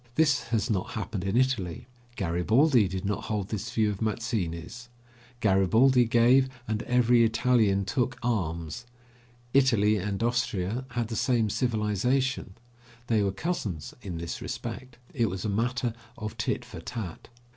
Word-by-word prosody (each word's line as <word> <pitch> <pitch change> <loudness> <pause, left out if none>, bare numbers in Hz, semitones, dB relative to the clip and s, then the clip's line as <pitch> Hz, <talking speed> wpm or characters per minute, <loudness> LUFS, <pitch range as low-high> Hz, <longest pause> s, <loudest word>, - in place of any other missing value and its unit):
This 145 -3 +3
has 115 -3 0
not 100 -7 -2
happened 105 -3 -3
in 95 +4 0
Italy. 120 -9 0 0.3
Garibaldi 110 - +3
did 95 +1 -4
not 105 0 -2
hold 105 -3 -2
this 110 +2 -3
view 110 -2 +2
of 100 - -7
Mazzini's. 110 0 -3 0.5
Garibaldi 110 +6 +4
gave, 120 +3 +4 0.2
and 110 0 -1
every 120 -1 +4
Italian 115 -3 +2
took 125 +3 -1
arms. 90 -2 -2 0.7
Italy 115 -6 +4
and 100 +1 -2
Austria 115 -1 -1
had 115 -2 0
the 115 - -3
same 115 -2 +1
civilization; 120 0 0 0.5
they 115 -3 +2
were 100 -1 +1
cousins 100 - -3
in 90 -4 -5
this 85 0 -5
respect. 130 -2 -6 0.2
It 115 -5 +1
was 95 +1 -5
a - - 0
matter 120 +3 0 0.2
of 110 +1 -5
tit 125 +1 -2
for 105 -9 -9
tat. 100 -2 -6
110 Hz, 145 wpm, -28 LUFS, 100-125 Hz, 0.7 s, Garibaldi